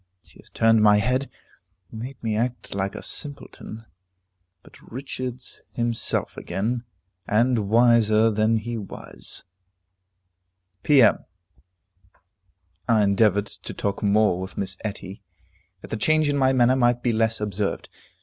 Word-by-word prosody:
She - - -22
has - - -17
turned 115 -1 +3
my 105 -1 +6
head; 130 +6 0 0.6
made 120 +4 -7
me 110 -2 -1
act 120 +3 -2
like 100 0 -2
a - - -7
simpleton. 140 -6 -4 0.8
But - - -18
"Richard's 130 0 -6
himself 120 -1 -1
again," 115 +5 -3 0.4
and 115 -1 +2
wiser 115 -1 +4
than 110 +2 +2
he 115 +1 -4
was. 100 - -8 1.4
P.M. 135 -7 +5 1.7
I 110 -2 +4
endeavored 100 0 +3
to - - -9
talk 100 -1 -2
more 105 -3 +2
with 95 - -8
Miss 95 -2 -3
Etty, 100 -2 -6 0.6
that - - -11
the 110 - -2
change 155 +6 +2
in 145 - +1
my 130 -2 +3
manner 130 -1 +4
might 120 -1 +2
be 120 - +1
less 110 0 +1
observed. 105 -1 -3
115 Hz, 130 wpm, -24 LUFS, 105-125 Hz, 1.7 s, my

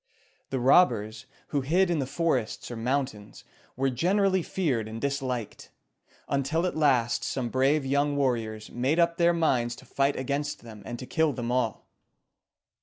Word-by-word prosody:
The 135 - -2
robbers, 120 -5 +3 0.2
who 145 - 0
hid 175 +7 +2
in 165 - +1
the 135 - -2
forests 135 -7 -1
or - - -4
mountains, 120 -3 -3 0.3
were 135 +1 0
generally 190 - +2
feared 140 - -1
and 110 +1 -6
disliked, 130 -4 -3 0.6
until 140 +5 0
at 180 - -2
last 130 -7 +2
some 125 -3 -2
brave 135 +4 +2
young 140 +2 +1
warriors 115 -5 -1
made 130 +6 0
up 170 -1 +2
their 170 0 +4
minds 125 -8 +1
to - - -15
fight 140 +1 0
against 140 +2 -3
them 110 -3 -11
and 120 - -5
to 130 - -7
kill 160 +1 +1
them 120 -2 -3
all. 125 -4 -1
135 Hz, 160 wpm, -27 LUFS, 120-155 Hz, 0.6 s, their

